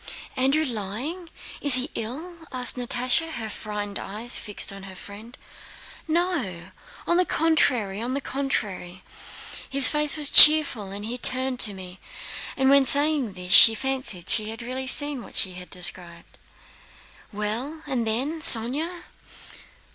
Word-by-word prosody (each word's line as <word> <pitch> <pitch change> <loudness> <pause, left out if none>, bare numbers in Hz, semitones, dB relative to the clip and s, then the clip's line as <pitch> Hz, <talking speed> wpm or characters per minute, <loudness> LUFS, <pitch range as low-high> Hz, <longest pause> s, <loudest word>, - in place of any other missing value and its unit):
"Andrew 275 +4 0
lying? 250 - -6 0.3
Is 285 -3 +5
he 255 +3 -3
ill?" 305 +11 -8
asked 250 -2 -3
Natásha, 250 +6 -1
her 220 -4 -7
frightened 205 -1 -7
eyes 220 +5 -6
fixed 205 -1 -4
on 195 - -11
her 190 -1 -12
friend. 210 +6 -12 0.7
"No, 310 - -3 0.4
on 345 - 0
the 365 - +3
contrary, 250 - 0
on 250 +3 -4
the - - -2
contrary! 205 -10 -5 0.7
His 275 -1 +5
face 300 0 +3
was 295 -2 +2
cheerful, 300 -10 +6
and 200 +2 -8
he 245 +3 -6
turned 255 0 +1
to 210 -4 +6
me." 185 0 -11 0.6
And 265 0 +1
when 280 -1 +4
saying 285 -5 +2
this 180 0 -5
she 225 - +8
herself - - -8
fancied 260 -9 -3
she 215 -1 +3
had 225 +1 -9
really 260 +2 -5
seen 290 0 0
what - - -14
she 190 -2 +1
described. 175 -1 -6 0.9
"Well, 230 +10 -5
and 255 -5 -4
then, 265 +9 -3
Sónya?..." 295 +9 +4
250 Hz, 145 wpm, -23 LUFS, 205-285 Hz, 0.9 s, she